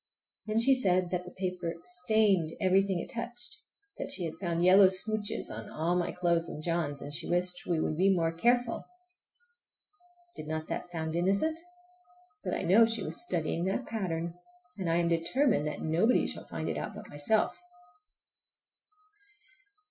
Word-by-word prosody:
Then 215 +1 +1
she 270 +4 +6
said 185 -8 +2
that 180 -1 -2
the 180 - -9
paper 180 -3 -3
stained 180 -2 +2
everything 190 0 +2
it - - -6
touched, 240 +1 -4 0.4
that - - -4
she 180 -2 0
had 160 - -4
found 170 -2 -1
yellow 190 +2 +8
smooches 205 +2 0
on - - -7
all 165 +3 -1
my 175 -1 0
clothes 170 -2 0
and 150 - -7
John's, 160 -4 -2
and 145 - -7
she 155 - -2
wished 180 0 +1
we 170 -2 +1
would 155 -1 -1
be 190 +3 +4
more 165 -3 +1
careful! 240 +7 +1 1.5
Did 155 - -8
not 155 0 -4
that - - -3
sound 160 -2 -3
innocent? 200 - +1 0.8
But - - -2
I - - -3
know 220 +6 +6
she 225 -3 -1
was - - -2
studying 170 - -1
that 195 +7 -1
pattern, 170 -6 -3 0.5
and 180 -3 -2
I 165 - +2
am 170 0 +2
determined 170 - +1
that 150 - -5
nobody 175 +10 +2
shall - - -6
find - - -5
it - - -2
out - - -5
but - - -9
myself! 145 - 0
180 Hz, 165 wpm, -30 LUFS, 165-210 Hz, 1.5 s, yellow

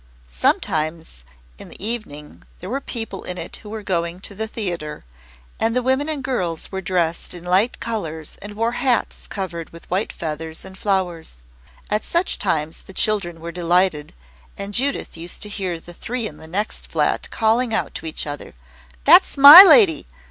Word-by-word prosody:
Sometimes 155 - -1 0.4
in - - -10
the - - -13
evening 210 -11 -5 0.2
there 185 +4 -8
were 275 +2 -2
people 225 -7 -6
in 180 - -5
it 170 0 -7
who 210 - -13
were 215 0 -6
going 170 -2 -2
to 200 - -4
the 220 +2 -4
theatre, 175 -9 -5 0.6
and 225 +1 0
the 250 - +1
women 265 +4 +1
and 295 -4 -4
girls 180 - -2
were 190 -1 -4
dressed 175 -2 -1
in 175 - -9
light 190 +7 +1
colours 165 -9 -5
and 205 +1 -9
wore 230 +2 0
hats 245 0 -1
covered 170 -5 -5
with 165 - -14
white 190 +4 -1
feathers 160 +1 -6
and 190 0 -10
flowers. 180 - -2 0.5
At 210 +1 0
such 340 +2 -1
times 160 -5 -2
the 190 - -13
children 185 -5 0
were 170 +1 -6
delighted, 175 -3 0 0.4
and 200 +1 -6
Judith 270 -5 -1
used 170 +2 -4
to 210 - -6
hear 190 -5 -4
the 175 +1 -13
three 240 +6 -4
in 155 -8 -6
the 160 - -12
next 200 +6 -3
flat - - -1
calling 230 +2 +1
out 220 - -1
to - - -6
each 160 - -4
other, 145 - -7 0.5
"That's - - +6
MY 285 +6 +13
lady! 220 - +5
190 Hz, 175 wpm, -21 LUFS, 165-225 Hz, 0.6 s, MY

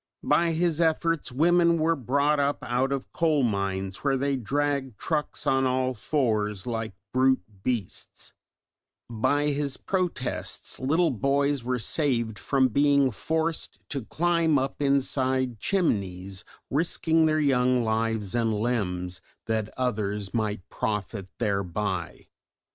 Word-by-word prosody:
By 170 -1 +3
his 170 0 +1
efforts 165 -2 +1
women 170 +5 +4
were 165 +1 +2
brought 140 +3 +1
up 140 0 +1
out 125 +2 0
of 140 -1 -4
coal 155 -4 +2
mines 95 -3 -1
where 135 -2 0
they 140 +1 0
dragged 135 0 -1
trucks 150 +3 -2
on 135 0 +3
all 130 0 0
fours 110 -6 -1
like 115 -4 -3 0.2
brute 130 -4 +3 0.2
beasts, 115 -4 -4 0.8
by 145 +6 +1
his 140 -1 -1
protests 180 -9 -2
little 160 +6 +2
boys 140 +2 +1
were 125 +1 -1
saved 115 -3 0
from 130 +2 +2
being 140 +1 +3
forced 160 +7 -2
to 140 -4 -3
climb 170 +2 +2
up 135 +2 -2
inside 130 -3 +1
chimneys 100 - -1 0.3
risking 160 +1 +2
their 155 0 +2
young 125 -4 +3
lives 110 -2 -1
and 115 -2 +1
limbs 95 -5 -2 0.2
that 110 -1 -1
others 105 -5 -2
might 105 -4 -2
profit 105 -2 -3
thereby. 100 -4 -2
130 Hz, 125 wpm, -26 LUFS, 110-145 Hz, 0.8 s, women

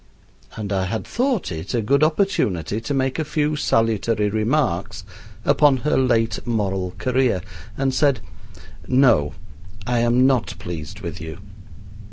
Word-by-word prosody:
and 105 -2 -4
I 95 -1 0
had 110 +4 -3
thought 250 - -1
it 80 +7 -4
a 115 - +1
good 140 +6 +3
opportunity 115 - 0
to 115 - -5
make 135 +2 0
a - - +1
few 150 0 0
salutary 115 -5 +1
remarks 110 - 0 0.4
upon 145 -3 +4
her 150 - +2
late 115 -4 +2
moral 95 -6 -2
career, 125 -6 +1 0.4
and 135 -1 0
said: 140 -2 +2 0.7
"No, 115 - +3 0.5
I 120 0 +1
am 120 +2 +3
not 130 -4 +1
pleased 80 -4 -7
with - - -6
you." 80 0 -7
120 Hz, 140 wpm, -22 LUFS, 100-135 Hz, 0.7 s, upon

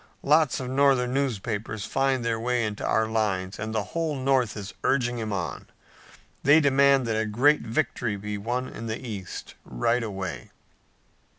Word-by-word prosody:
Lots 150 -2 +3
of 130 - -4
Northern 130 -2 +3
newspapers 110 -5 -2
find 135 -3 0
their 115 -1 0
way 120 0 0
into 105 -1 -4
our 110 - +2
lines, 105 -4 -1
and 110 +1 -3
the 110 -2 0
whole 165 -3 -1
North 130 -4 +1
is 100 -1 -6
urging 120 -3 +1
him 110 -1 -3
on. 95 -3 -4 0.7
They 145 +3 +6
demand 140 -2 +4
that 110 -1 0
a 110 - -2
great 135 +8 +3
victory 120 -3 -1
be 105 +1 -5
won 125 +5 -2
in 115 - -7
the 110 0 -2
east 105 -8 -7
right 115 - 0
away." 95 -6 -5
115 Hz, 165 wpm, -26 LUFS, 105-135 Hz, 0.7 s, They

